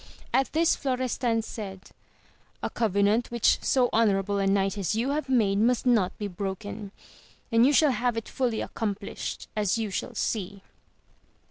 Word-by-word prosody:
At 270 Hz, 0 st, +2 dB
this 330 Hz, +1 st, +3 dB
Florestan 250 Hz, -3 st, -1 dB
said, 195 Hz, -4 st, -8 dB, 0.7 s
A -, -, -2 dB
covenant 210 Hz, +1 st, +1 dB
which 235 Hz, -2 st, +2 dB
so 255 Hz, -2 st, +3 dB
honourable 200 Hz, -2 st, +2 dB
a 195 Hz, -, +1 dB
knight 195 Hz, 0 st, +2 dB
as 200 Hz, 0 st, -1 dB
you 240 Hz, +5 st, 0 dB
have 295 Hz, -2 st, -2 dB
made 210 Hz, -6 st, +3 dB
must 240 Hz, +3 st, +2 dB
not 220 Hz, -7 st, +2 dB
be 205 Hz, -, -3 dB
broken, 200 Hz, +2 st, -5 dB, 0.6 s
and 230 Hz, +2 st, +5 dB
you -, -, +4 dB
shall 295 Hz, 0 st, +5 dB
have 245 Hz, -2 st, 0 dB
it 225 Hz, -, -4 dB
fully 240 Hz, -4 st, -1 dB
accomplished 205 Hz, -2 st, -4 dB
as 210 Hz, -1 st, +1 dB
you 220 Hz, -3 st, -2 dB
shall -, -, -4 dB
see. 200 Hz, -2 st, -3 dB
220 Hz, 155 wpm, -27 LUFS, 200-245 Hz, 0.7 s, and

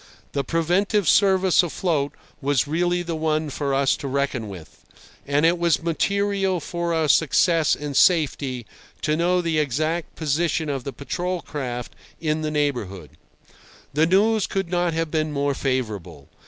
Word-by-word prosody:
The 140 Hz, -, -1 dB
preventive 175 Hz, -, +1 dB
service 190 Hz, -1 st, +4 dB
afloat 160 Hz, -4 st, -1 dB, 0.3 s
was 140 Hz, -1 st, +1 dB
really 175 Hz, +3 st, 0 dB
the 170 Hz, -1 st, -3 dB
one 155 Hz, -1 st, -1 dB
for 140 Hz, 0 st, -2 dB
us 135 Hz, -1 st, +2 dB
to 140 Hz, -, -6 dB
reckon 135 Hz, -5 st, -1 dB
with, 85 Hz, -6 st, -12 dB, 0.4 s
and 145 Hz, +2 st, +2 dB
it 170 Hz, +1 st, +3 dB
was 170 Hz, -1 st, +2 dB
material 195 Hz, +2 st, 0 dB
for 170 Hz, +2 st, -3 dB
our 160 Hz, -2 st, +1 dB
success 165 Hz, +1 st, +3 dB
and 145 Hz, -1 st, -6 dB
safety 140 Hz, -8 st, +2 dB, 0.4 s
to 150 Hz, -, +1 dB
know 175 Hz, +2 st, +2 dB
the 165 Hz, -2 st, 0 dB
exact 155 Hz, +4 st, -1 dB
position 160 Hz, +1 st, 0 dB
of 135 Hz, -3 st, -3 dB
the 140 Hz, -, -3 dB
patrol 175 Hz, +7 st, -4 dB
craft 125 Hz, -5 st, -5 dB, 0.2 s
in 155 Hz, -1 st, -1 dB
the 155 Hz, -, -1 dB
neighbourhood. 120 Hz, -, -2 dB, 0.8 s
The 155 Hz, +3 st, +3 dB
news 210 Hz, +3 st, +3 dB
could 195 Hz, -3 st, -2 dB
not 175 Hz, -2 st, +1 dB
have 165 Hz, -1 st, -1 dB
been 155 Hz, -1 st, 0 dB
more 140 Hz, -1 st, 0 dB
favourable. 105 Hz, -, -3 dB
155 Hz, 155 wpm, -23 LUFS, 140-175 Hz, 0.8 s, service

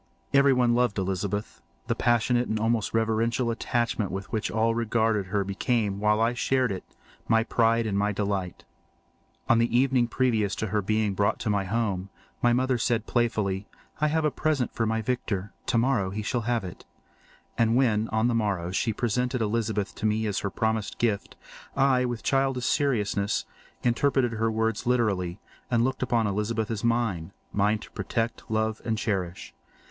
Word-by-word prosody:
Everyone 130 Hz, -3 st, +4 dB
loved 120 Hz, -4 st, +1 dB
Elizabeth. 95 Hz, +2 st, -2 dB, 0.2 s
The -, -, 0 dB
passionate 120 Hz, +1 st, +2 dB
and 110 Hz, -, -1 dB
almost 115 Hz, 0 st, +1 dB
reverential 115 Hz, +2 st, +1 dB
attachment 115 Hz, -3 st, -1 dB
with 95 Hz, +1 st, -6 dB
which 110 Hz, -1 st, -1 dB
all 115 Hz, +1 st, +1 dB
regarded 115 Hz, -3 st, +1 dB
her 100 Hz, +1 st, 0 dB
became, 100 Hz, +1 st, -1 dB
while 105 Hz, +1 st, +2 dB
I 115 Hz, +2 st, +2 dB
shared 130 Hz, -1 st, +1 dB
it, 95 Hz, -, -4 dB, 0.4 s
my 115 Hz, 0 st, +4 dB
pride 115 Hz, 0 st, +2 dB
and 105 Hz, -3 st, -1 dB
my 100 Hz, +1 st, +1 dB
delight. 100 Hz, -3 st, -3 dB, 0.8 s
On 115 Hz, -, +4 dB
the 120 Hz, +1 st, +2 dB
evening 130 Hz, -2 st, +3 dB
previous 115 Hz, -5 st, +1 dB
to 110 Hz, -, -2 dB
her 105 Hz, +1 st, +1 dB
being 110 Hz, 0 st, 0 dB
brought 100 Hz, +1 st, +1 dB
to 110 Hz, -, 0 dB
my 100 Hz, -1 st, 0 dB
home, 100 Hz, -3 st, -1 dB, 0.3 s
my 120 Hz, -, +4 dB
mother 130 Hz, +1 st, +2 dB
had -, -, -4 dB
said 115 Hz, -2 st, +1 dB
playfully, 105 Hz, -5 st, 0 dB, 0.3 s
"I 155 Hz, -, +3 dB
have 160 Hz, +1 st, +1 dB
a 150 Hz, -, +2 dB
pretty -, -, -17 dB
present 150 Hz, -6 st, +1 dB
for 115 Hz, -, 0 dB
my 110 Hz, 0 st, 0 dB
Victor—tomorrow 115 Hz, 0 st, -1 dB
he 105 Hz, +3 st, -4 dB
shall 120 Hz, +3 st, -1 dB
have 120 Hz, -3 st, +1 dB
it." 90 Hz, -2 st, -8 dB, 0.7 s
And 115 Hz, 0 st, +2 dB
when, 115 Hz, -4 st, +2 dB
on 110 Hz, +2 st, +1 dB
the 120 Hz, -, +1 dB
morrow, 100 Hz, -6 st, 0 dB
she 110 Hz, +4 st, 0 dB
presented 125 Hz, +3 st, -1 dB
Elizabeth 110 Hz, -2 st, -1 dB
to 110 Hz, -, -1 dB
me 110 Hz, +1 st, 0 dB
as 105 Hz, -2 st, -1 dB
her 100 Hz, -, -2 dB
promised 110 Hz, +1 st, -1 dB
gift, 110 Hz, -4 st, -1 dB, 0.4 s
I, 135 Hz, -2 st, +3 dB
with 120 Hz, -2 st, -4 dB
childish 135 Hz, -2 st, +1 dB
seriousness, 105 Hz, -7 st, +1 dB, 0.4 s
interpreted 125 Hz, +1 st, +2 dB
her 115 Hz, 0 st, 0 dB
words 110 Hz, 0 st, -1 dB
literally 100 Hz, -7 st, +1 dB, 0.3 s
and 120 Hz, -1 st, +2 dB
looked 130 Hz, +2 st, -1 dB
upon 120 Hz, -3 st, +1 dB
Elizabeth 105 Hz, +2 st, -1 dB
as 110 Hz, -1 st, -3 dB
mine—mine 105 Hz, -2 st, 0 dB
to -, -, -12 dB
protect, 115 Hz, +3 st, -3 dB
love, 110 Hz, 0 st, 0 dB
and 110 Hz, -1 st, -1 dB
cherish. 95 Hz, -5 st, -3 dB
110 Hz, 170 wpm, -27 LUFS, 105-120 Hz, 0.8 s, Everyone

